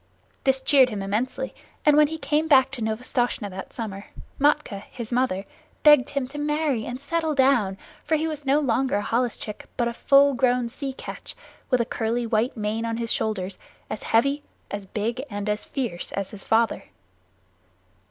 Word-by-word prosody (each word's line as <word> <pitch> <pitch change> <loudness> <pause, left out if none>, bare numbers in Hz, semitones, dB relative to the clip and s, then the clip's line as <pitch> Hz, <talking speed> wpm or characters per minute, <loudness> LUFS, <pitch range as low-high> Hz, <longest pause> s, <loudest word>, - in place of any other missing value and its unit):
This 265 0 +3
cheered 265 -3 +6
him 205 -4 -4
immensely; 240 - -2 0.3
and 300 -1 +6
when 300 0 +6
he 320 +2 -5
came 300 +1 0
back 265 -4 +5
to 265 -3 -7
Novastoshnah 220 -1 -1
that 190 +1 -7
summer, 205 -4 -6 0.3
Matkah, 285 -8 +2
his 235 -2 -7
mother, 240 -6 0 0.4
begged 295 -4 +7
him 280 -3 -2
to 295 +2 -6
marry 295 -5 0
and 245 +1 -5
settle 320 +1 -1
down, 250 -8 +3 0.3
for 320 - +1
he 315 +1 0
was 305 -2 -5
no 275 +2 +3
longer 265 -2 +1
a 205 - 0
holluschick 230 -2 -2
but 240 - +1
a 235 - -2
full 280 +3 +5
grown 245 -1 +2
sea 270 +2 -5
catch, - - -8 0.3
with 255 -3 +3
a - - 0
curly 235 0 -1
white 225 +2 0
mane 215 +1 -1
on 230 0 -2
his 230 -1 -1
shoulders, 195 -3 -2 0.3
as - - -4
heavy, 275 +6 +2 0.3
as 205 -1 -5
big, 230 +6 -2
and 205 -1 -4
as 210 0 -1
fierce 235 -11 -4
as 195 -1 -3
his 200 -2 -9
father. 225 +1 +1
245 Hz, 180 wpm, -25 LUFS, 215-280 Hz, 0.4 s, begged